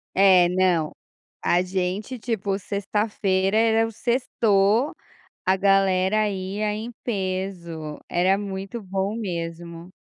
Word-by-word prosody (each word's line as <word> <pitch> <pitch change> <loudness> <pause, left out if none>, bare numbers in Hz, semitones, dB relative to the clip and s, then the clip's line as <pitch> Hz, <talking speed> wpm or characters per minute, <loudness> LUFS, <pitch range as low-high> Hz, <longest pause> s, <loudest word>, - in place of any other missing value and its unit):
É 185 -3 +6
não, 180 -4 +2 0.5
a 175 +1 +3
gente 190 +6 -3
tipo 205 -3 -2
sexta-feira 200 -1 0
era 225 0 +4
o - - -9
sextou, 225 0 +2 0.5
a 190 +1 +4
galera 195 +1 +3
ia 200 +2 -2
em 225 +3 -5
peso, 185 -7 -4
era 185 +2 +3
muito 195 +2 -5
bom 195 +1 -2
mesmo. 170 -3 -5
195 Hz, 105 wpm, -24 LUFS, 185-210 Hz, 0.5 s, É